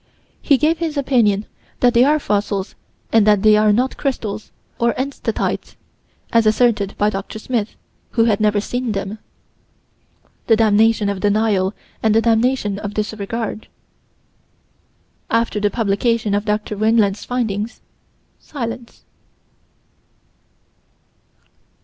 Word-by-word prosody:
He 280 - +3
gave 315 +4 +1
his 320 -3 -3
opinion 230 -7 +2 0.3
that 245 -1 +3
they 240 +1 +5
are 295 +3 +4
fossils 205 -6 -2 0.4
and 220 -2 +4
that 210 -1 +4
they 215 -1 +6
are 210 0 +4
not 250 +5 0
crystals 215 -6 -3 0.3
of 235 0 +1
enstatite, 275 +2 -3 0.6
as 230 -1 +4
asserted 215 -3 +2
by 210 +1 +2
Prof. 195 -1 -5
Smith, 220 -1 -3 0.4
who 225 -2 +3
had 215 -3 +2
never 210 -1 +2
seen 245 +2 -3
them. 195 +2 -4 1.3
The 225 - +5
damnation 220 0 +3
of 200 -1 -2
denial 205 -1 +1 0.3
and 220 -1 +2
the 225 - +5
damnation 225 -3 +1
of 205 -1 -6
disregard: 215 +1 -4 1.6
After 230 -2 0
the 205 0 +1
publication 220 0 0
of 205 +1 0
Dr. 210 0 -2
Weinland's 215 -1 +2
findings 225 -3 -3 0.6
silence. 235 -4 -7
220 Hz, 120 wpm, -19 LUFS, 205-235 Hz, 1.6 s, they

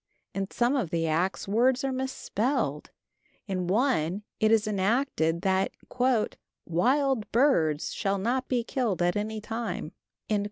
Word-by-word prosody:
In 195 0 -2
some 245 +3 +1
of 235 - 0
the 165 0 0
acts 170 +6 0
words 245 +6 +3
are 270 - 0
misspelled; 255 - -1 0.6
in 185 -3 -2
one 190 - +1 0.2
it 220 0 +3
is 225 -1 +4
enacted 195 - +1
that 190 0 +1 0.9
"wild 255 - +1
birds 170 - +2
shall 200 -1 0
not 245 +6 -1
be 245 -2 0
killed 230 -7 -1
at 175 0 +2
any 215 +1 -2
time." 220 -7 -4
215 Hz, 130 wpm, -28 LUFS, 180-250 Hz, 0.9 s, is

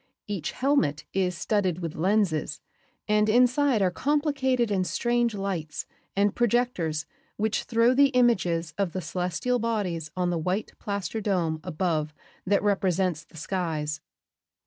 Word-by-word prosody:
Each 195 -6 -3
"helmet" 180 - +1
is 180 -2 0
studded 190 -5 0
with 165 -3 -4
lenses 180 -4 +1 0.5
and 210 0 +3
inside 250 0 +4
are 185 - +2
complicated 270 - +1
and 185 -2 +1
strange 240 -2 +1
lights 190 -6 -3 0.3
and 200 0 +2
projectors 225 -10 0 0.3
which 215 +1 0
throw 230 +1 +3
the 280 +2 +6
images 185 - +2
of 195 -4 0
the 185 - -2
celestial 180 +9 -1
bodies 195 -9 -2
on 180 -1 +1
the 170 - -1
white 185 +6 -2
plaster 200 +1 -3
dome 175 -6 0
above 155 -3 -1 0.3
that 200 +1 +2
represents 185 -4 +1
the - - -17
skies. 160 -4 -2
195 Hz, 135 wpm, -27 LUFS, 170-230 Hz, 0.5 s, the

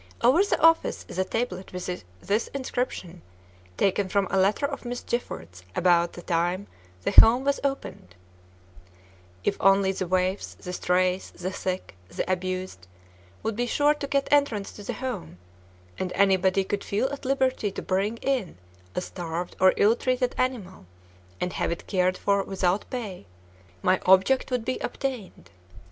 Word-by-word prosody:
Over 270 +11 +6
the 405 - 0
office 330 0 +3
is - - -6
a - - +4
tablet 190 -3 -3
with 180 0 -5 0.2
this 210 +3 0
inscription, 245 -10 -3 0.6
taken 195 0 +1
from 200 0 +1
a 195 - +2
letter 200 +9 +2
of 280 -1 -4
Miss 245 0 -4
Gifford's 90 - -5
about 175 -1 +3
the 175 - -10
time 175 +3 0 0.4
the - - 0
home 240 +4 +8
was 280 0 +1
opened: 270 - -4 1.3
"If - - 0
only 195 0 +4
the 185 -1 -3
waifs, 185 +2 0
the 180 - -7
strays, 180 +1 +1
the 185 +1 -4
sick, 185 - -4 0.2
the - - -3
abused, 185 - -3 0.6
would 220 - -1
be 245 +2 -1
sure 290 +4 +3
to 295 -1 -5
get 275 0 +1
entrance 280 -9 +2
to - - -11
the - - -3
home, 245 - -5 0.6
and 185 - -2
anybody 190 -1 +3
could 200 +1 -3
feel 210 +6 0
at 280 - -6
liberty 260 -4 +1
to 195 - -6
bring 200 +4 0
in 255 - -1 0.4
a - - 0
starved 175 -1 -5
or 185 0 +5
ill 215 +3 +5
treated 250 0 0
animal 210 - -3 0.5
and 180 0 -2
have - - -1
it 170 - -5
cared 185 -1 +1
for 200 0 +2
without 190 0 -1
pay, 205 - -6 0.6
my 185 - +3
object 190 +10 +5
would 250 -3 -1
be 255 0 -1
obtained. 220 - -5
195 Hz, 160 wpm, -26 LUFS, 185-245 Hz, 1.3 s, home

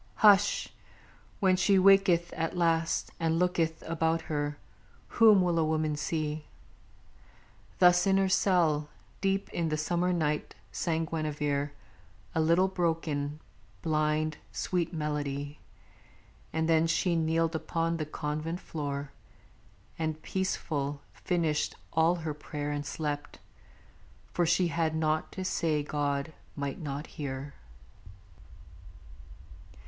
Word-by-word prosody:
Hush! 205 -1 +5 0.7
When 190 -2 +4
she 190 +2 +3
waketh 185 -3 +5
at 165 +2 -2
last 165 -1 +1
and 165 -1 +1
looketh 165 -2 0
about 165 0 0
her, 145 0 -1 0.6
Whom 215 -4 +7
will 175 -2 +1
a - - +3
woman 155 -1 0
see?_ 155 0 -2 1.3
Thus 180 +1 +5
in 195 0 +4
her 195 0 +3
cell, 165 -6 +2 0.3
Deep 195 0 +1
in 165 -2 -1
the 155 - 0
summer 175 +3 0
night, 150 -4 -1 0.2
sang 165 -1 -1
Guinevere 150 -2 -2 0.6
A 160 - +1
little, 170 +4 +4
broken, 160 -5 -1 0.4
blind, 155 0 +1
sweet 180 -3 -1
melody 145 -2 -3 0.9
And 160 0 0
then 165 0 +4
she 170 +2 +1
kneeled 165 0 +1
upon 165 +1 -1
the 155 - -2
convent 155 +3 -3
floor, 145 -5 -4 0.9
And, 155 -1 -2
peaceful, 145 -6 -2
finished 165 -5 -1 0.2
all 160 +2 +4
her 160 -3 -4
prayer 145 0 -5
and 145 -1 -3
slept; 145 -2 -4 1.0
For 175 -1 +2
she 180 +1 +3
had 160 -1 0
naught 155 0 0
to 190 - -4
say 155 -5 0
God 145 +1 -2 0.2
might 140 -1 -3
not 145 -2 -4
hear. 140 -2 -6
160 Hz, 115 wpm, -30 LUFS, 150-175 Hz, 1.3 s, Whom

